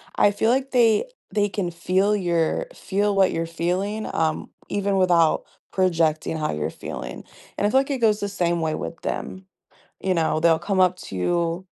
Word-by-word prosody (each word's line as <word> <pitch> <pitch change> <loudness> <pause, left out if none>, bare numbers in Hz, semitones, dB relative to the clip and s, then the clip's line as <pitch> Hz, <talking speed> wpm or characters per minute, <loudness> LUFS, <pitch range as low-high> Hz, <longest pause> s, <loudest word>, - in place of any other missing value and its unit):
I 205 - +4
feel 220 +3 +1
like 265 +1 0
they 235 - +4 0.3
they 205 -1 +1
can 190 -3 -2
feel 185 +4 +1
your 175 - 0
feel 205 +1 0
what 195 -1 +4
you're 165 - -1
feeling, 185 +6 -2
um, 160 -1 -1 0.2
even 200 -1 0
without 175 -4 +3 0.3
projecting 165 -4 +1
how 155 - -1
you're 75 0 -2
feeling, 60 +1 -7 0.3
and - - 0
I - - +1
feel 265 - +4
like 275 - -5
it 270 - -1
goes 215 -2 +3
the 205 - -2
same 175 -3 0
way 160 -1 0
with 165 - -5
them, 190 0 -5 0.5
you 190 - 0
know? 160 -2 +1
They'll 165 0 +4
come 195 -2 -1
up 185 -1 +4
to 100 - -9
you 170 - -1
185 Hz, 190 wpm, -23 LUFS, 165-205 Hz, 0.5 s, I